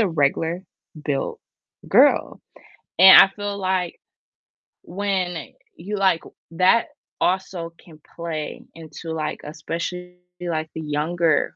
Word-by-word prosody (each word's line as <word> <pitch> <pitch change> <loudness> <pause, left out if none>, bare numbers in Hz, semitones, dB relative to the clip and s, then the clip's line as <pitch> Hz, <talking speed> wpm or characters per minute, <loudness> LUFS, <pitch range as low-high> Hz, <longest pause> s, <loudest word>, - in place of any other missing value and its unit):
a 215 - +3
regular 165 +3 0 0.4
built 140 -3 -2 0.5
girl," - - +4 0.6
and 190 +1 +10
I - - +7
feel 205 0 -5
like 185 -2 -2 0.8
when 185 -4 -3 0.2
you 200 +5 -5
like 190 -4 +2 0.3
that 185 +7 +3 0.3
also 180 -2 -1
can 155 -3 -17 0.2
play 160 -3 -5
into 165 0 -9
like, 155 -1 -3
especially, 170 +4 -6 0.2
like, 160 -3 -3
the 160 - -4
younger, 155 +1 0
170 Hz, 110 wpm, -22 LUFS, 160-185 Hz, 0.8 s, and